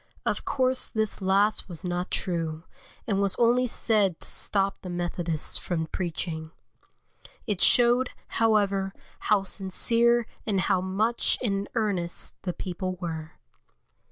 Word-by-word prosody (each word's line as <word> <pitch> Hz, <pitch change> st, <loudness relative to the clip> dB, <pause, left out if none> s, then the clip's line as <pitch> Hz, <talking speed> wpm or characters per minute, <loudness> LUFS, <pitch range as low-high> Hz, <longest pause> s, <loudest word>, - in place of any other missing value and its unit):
Of -, -, -1 dB
course 255 Hz, -1 st, +1 dB
this 220 Hz, -2 st, -2 dB
last 200 Hz, +2 st, +2 dB
was 175 Hz, 0 st, -6 dB
not 180 Hz, +1 st, -2 dB
true, 165 Hz, -3 st, -2 dB, 0.4 s
and 200 Hz, -3 st, +1 dB
was 200 Hz, -1 st, +1 dB
only 245 Hz, +2 st, +3 dB
said 210 Hz, -6 st, +3 dB
to -, -, -7 dB
stop 195 Hz, -1 st, +1 dB
the 185 Hz, -, -7 dB
Methodists 175 Hz, -2 st, 0 dB
from 165 Hz, -3 st, -2 dB
preaching. 160 Hz, -1 st, -4 dB, 1.0 s
It 205 Hz, -3 st, -1 dB
showed, 245 Hz, +1 st, +4 dB, 0.2 s
however, 200 Hz, -4 st, +1 dB, 0.3 s
how 210 Hz, -3 st, +4 dB
sincere 230 Hz, +5 st, +1 dB, 0.2 s
and 200 Hz, -4 st, 0 dB
how 180 Hz, +1 st, +2 dB
much 210 Hz, +6 st, 0 dB
in 200 Hz, -4 st, -1 dB
earnest 195 Hz, -6 st, -1 dB
the 180 Hz, -2 st, -3 dB
people 185 Hz, 0 st, -4 dB
were. 160 Hz, -3 st, -5 dB
195 Hz, 130 wpm, -27 LUFS, 175-220 Hz, 1.0 s, showed